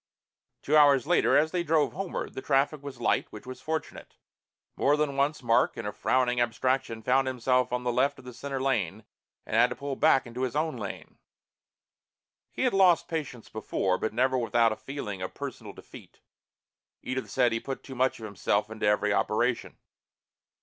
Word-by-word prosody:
Two 150 Hz, -, +1 dB
hours 140 Hz, -3 st, +6 dB
later, 175 Hz, +3 st, +3 dB
as 155 Hz, +2 st, +2 dB
they 180 Hz, -, 0 dB
drove 160 Hz, -2 st, +1 dB
homeward, 195 Hz, +2 st, -4 dB
the -, -, -6 dB
traffic 140 Hz, +3 st, +1 dB
was 140 Hz, -3 st, -8 dB
light, -, -, +1 dB
which 105 Hz, -, -11 dB
was 130 Hz, 0 st, -9 dB
fortunate. 160 Hz, +2 st, -5 dB, 0.6 s
More 145 Hz, +2 st, +2 dB
than 150 Hz, -2 st, 0 dB
once 140 Hz, 0 st, 0 dB
Mark, 115 Hz, -1 st, +2 dB
in -, -, -5 dB
a -, -, -2 dB
frowning 125 Hz, -1 st, +1 dB
abstraction, 120 Hz, -1 st, -1 dB
found 130 Hz, +3 st, +2 dB
himself 125 Hz, 0 st, +1 dB
on 125 Hz, 0 st, -2 dB
the 125 Hz, -1 st, 0 dB
left 135 Hz, +4 st, +1 dB
of -, -, -15 dB
the 125 Hz, -, -9 dB
center 135 Hz, +2 st, -5 dB
line 110 Hz, -7 st, -1 dB, 0.4 s
and -, -, -4 dB
had 120 Hz, +2 st, +5 dB
to -, -, -5 dB
pull 140 Hz, -1 st, -4 dB
back 145 Hz, -2 st, +3 dB
into 120 Hz, +1 st, -7 dB
his 130 Hz, 0 st, -2 dB
own 155 Hz, +1 st, 0 dB
lane. -, -, -8 dB, 1.3 s
He -, -, -3 dB
had 255 Hz, -, +2 dB
lost 185 Hz, -3 st, +4 dB
patients 145 Hz, -8 st, -5 dB
before, 95 Hz, -3 st, -1 dB
but -, -, -1 dB
never 130 Hz, +4 st, +1 dB
without 115 Hz, -1 st, +2 dB
a -, -, -2 dB
feeling 105 Hz, -10 st, -6 dB
of 95 Hz, -, -5 dB
personal -, -, -7 dB
defeat. -, -, -14 dB, 0.8 s
Edith 130 Hz, 0 st, -4 dB
said 125 Hz, -3 st, +2 dB
he 115 Hz, -, 0 dB
put 135 Hz, +2 st, -6 dB
too 135 Hz, -, -9 dB
much 130 Hz, +1 st, +1 dB
of 110 Hz, -, -7 dB
himself 105 Hz, +1 st, -1 dB
into 110 Hz, -1 st, -2 dB
every 105 Hz, 0 st, +2 dB
operation. 120 Hz, +4 st, 0 dB
130 Hz, 185 wpm, -28 LUFS, 115-140 Hz, 1.3 s, hours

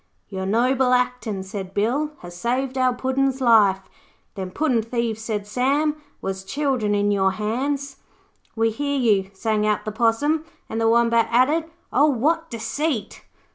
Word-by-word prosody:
'Your 190 Hz, -1 st, -4 dB
noble 250 Hz, +4 st, +2 dB
actin',' 250 Hz, -5 st, 0 dB
said 190 Hz, 0 st, -7 dB
Bill, 250 Hz, +9 st, +1 dB
'has 175 Hz, 0 st, -10 dB
saved 250 Hz, +7 st, -1 dB
our 255 Hz, -1 st, +3 dB
Puddin's 265 Hz, +1 st, 0 dB
life.' 210 Hz, -6 st, +4 dB, 0.5 s
'Them 190 Hz, -2 st, -5 dB
puddin' 255 Hz, +1 st, +1 dB
thieves,' 230 Hz, -1 st, -2 dB
said 215 Hz, -2 st, -3 dB
Sam, 275 Hz, +7 st, +1 dB, 0.3 s
'was 190 Hz, 0 st, -3 dB
children 255 Hz, -3 st, 0 dB
in 205 Hz, 0 st, +2 dB
your 190 Hz, -1 st, +2 dB
hands.' 270 Hz, +7 st, -2 dB, 0.6 s
'We 225 Hz, 0 st, +2 dB
hear 285 Hz, +4 st, -2 dB
you,' 205 Hz, -7 st, +2 dB
sang 215 Hz, +1 st, 0 dB
out 210 Hz, -1 st, 0 dB
the 215 Hz, -, -2 dB
Possum, 240 Hz, +8 st, +1 dB, 0.2 s
and 225 Hz, -, -3 dB
the 225 Hz, -, +3 dB
Wombat 230 Hz, 0 st, +3 dB
added, 295 Hz, +7 st, +2 dB, 0.2 s
'Oh, 290 Hz, +3 st, +5 dB
what 315 Hz, +5 st, +1 dB
deceit!' 235 Hz, +3 st, -3 dB
235 Hz, 150 wpm, -23 LUFS, 210-270 Hz, 0.6 s, Oh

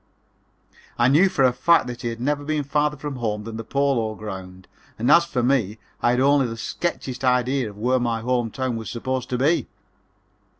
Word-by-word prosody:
I 120 Hz, +1 st, +4 dB
knew 165 Hz, +8 st, +5 dB
for 135 Hz, -, +1 dB
a 125 Hz, -1 st, +4 dB
fact 165 Hz, +7 st, +3 dB
that 120 Hz, -1 st, -7 dB
he 120 Hz, -, -3 dB
had 115 Hz, 0 st, -4 dB
never 145 Hz, +3 st, -1 dB
been 150 Hz, 0 st, -1 dB
farther 150 Hz, +1 st, 0 dB
from 145 Hz, -1 st, -5 dB
home 105 Hz, -3 st, -2 dB
than 110 Hz, 0 st, -7 dB
the 115 Hz, -, -5 dB
Polo 125 Hz, -4 st, 0 dB
Grounds, 95 Hz, -3 st, -8 dB, 0.3 s
and 115 Hz, -, +2 dB
as 170 Hz, 0 st, +6 dB
for 130 Hz, -8 st, -2 dB
me 120 Hz, -5 st, +1 dB, 0.2 s
I -, -, +3 dB
had 125 Hz, +1 st, +2 dB
only 140 Hz, 0 st, +4 dB
the 115 Hz, 0 st, -6 dB
sketchiest 130 Hz, -1 st, -4 dB
idea 125 Hz, -1 st, +1 dB
of 100 Hz, -, -13 dB
where 125 Hz, +4 st, +1 dB
my 115 Hz, -2 st, -1 dB
home 120 Hz, -1 st, 0 dB
town 130 Hz, 0 st, -3 dB
was 110 Hz, -2 st, -6 dB
supposed 130 Hz, +1 st, -3 dB
to 125 Hz, -, -1 dB
be. 150 Hz, +7 st, +1 dB
125 Hz, 205 wpm, -23 LUFS, 115-140 Hz, 0.3 s, as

